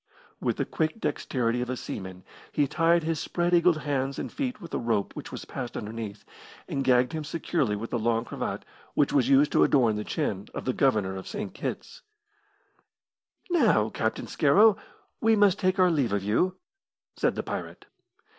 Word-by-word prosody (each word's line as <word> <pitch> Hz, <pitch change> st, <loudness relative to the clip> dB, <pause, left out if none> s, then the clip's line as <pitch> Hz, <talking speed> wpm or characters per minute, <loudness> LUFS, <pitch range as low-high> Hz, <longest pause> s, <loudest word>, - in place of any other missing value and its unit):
With -, -, -1 dB
the -, -, 0 dB
quick 160 Hz, +7 st, -2 dB
dexterity 125 Hz, -, -1 dB
of 125 Hz, -, -3 dB
a 130 Hz, -, -2 dB
seaman, 95 Hz, -4 st, -7 dB, 0.3 s
he 145 Hz, -2 st, +1 dB
tied 165 Hz, +3 st, +3 dB
his 160 Hz, 0 st, -1 dB
spread 175 Hz, 0 st, -1 dB
eagled 170 Hz, -1 st, +5 dB
hands 135 Hz, -1 st, -1 dB
and -, -, -4 dB
feet 255 Hz, -5 st, -3 dB
with 170 Hz, -5 st, -11 dB
a -, -, 0 dB
rope 115 Hz, -4 st, -1 dB
which -, -, -7 dB
was -, -, -7 dB
passed 125 Hz, -2 st, -6 dB
underneath, 105 Hz, -1 st, -6 dB, 0.4 s
and 135 Hz, -, -2 dB
gagged 125 Hz, +2 st, +3 dB
him 155 Hz, -1 st, -3 dB
securely 150 Hz, -7 st, -1 dB
with 110 Hz, +3 st, -6 dB
the 120 Hz, -, 0 dB
long 115 Hz, +1 st, +1 dB
cravat -, -, -4 dB, 0.3 s
which 145 Hz, -, +2 dB
used 140 Hz, +2 st, +4 dB
to -, -, +4 dB
adorn 120 Hz, -6 st, +3 dB
the 105 Hz, -, -3 dB
chin 100 Hz, 0 st, -2 dB
of -, -, -5 dB
the 130 Hz, -, 0 dB
Governor 105 Hz, -9 st, +1 dB
of 95 Hz, -, -8 dB
St. 205 Hz, -2 st, -5 dB
Kitt's. -, -, -6 dB, 1.5 s
"Now, 215 Hz, -, +3 dB
Captain 110 Hz, -, -2 dB
Scarrow, 200 Hz, +9 st, +5 dB, 0.5 s
we 225 Hz, 0 st, +4 dB
must 205 Hz, -2 st, +4 dB
take 185 Hz, 0 st, +1 dB
our 185 Hz, -1 st, +5 dB
leave 135 Hz, -10 st, +1 dB
of 100 Hz, -1 st, 0 dB
you," 180 Hz, -, +1 dB, 0.6 s
said -, -, +1 dB
the -, -, -3 dB
pirate. -, -, -6 dB
135 Hz, 180 wpm, -27 LUFS, 115-175 Hz, 1.5 s, eagled